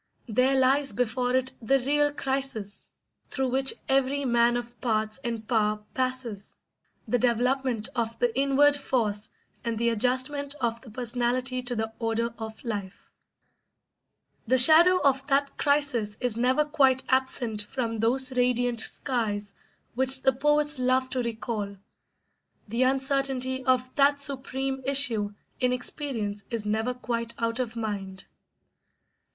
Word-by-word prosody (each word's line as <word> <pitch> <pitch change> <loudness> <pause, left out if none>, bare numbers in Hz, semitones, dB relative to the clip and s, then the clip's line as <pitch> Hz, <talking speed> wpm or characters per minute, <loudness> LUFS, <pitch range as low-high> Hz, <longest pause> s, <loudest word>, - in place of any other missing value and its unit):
There 255 +4 +2
lies 270 +2 +2
before 250 +1 -1
it 260 0 0
the 270 +5 +3
real 290 +3 +2
crisis 265 -8 -2 0.4
through 265 -1 -1
which 265 +1 +2
every 275 +1 +1
man 240 -1 +3
of 240 0 -8
parts 215 -1 0
and 230 -2 -4
power 210 -3 0
passes: 255 -6 -3 0.5
the 245 - +1
development 245 -1 +1
of 230 -2 -2
the 240 -1 0
inward 280 +2 +4
force 220 -7 0 0.3
and 230 -2 -2
the 235 +1 +1
adjustment 260 +5 0
of 235 -1 -2
the 245 - -13
personality 250 +2 -1
to 245 0 -3
the 220 0 -3
order 230 0 -1
of 220 0 -8
life. 205 -5 -6 1.4
The 260 +3 +3
shadow 330 +8 +7
of 270 -1 +2
that 280 0 +1
crisis 280 -8 0
is 250 -4 -1
never 255 +5 +2
quite 270 -4 +2
absent 260 -4 0
from 230 +1 -4
those 255 +4 +1
radiant 245 -1 +1
skies 220 -5 -2 0.4
which 260 +1 +2
the 265 - +4
poets 295 +1 +2
love 255 +1 +1
to 255 - -1
recall; 220 -3 -4 0.9
the 230 +4 -2
uncertainty 265 0 +1
of 255 0 +1
that 285 0 +4
supreme 270 -1 -1
issue 245 -7 +3 0.2
in 250 0 +1
experience 245 -5 -2
is 230 -3 -4
never 220 +4 -1
quite 235 -2 -3
out 230 +1 -1
of 240 -3 -3
mind. 200 -4 -5
250 Hz, 135 wpm, -26 LUFS, 225-265 Hz, 1.4 s, shadow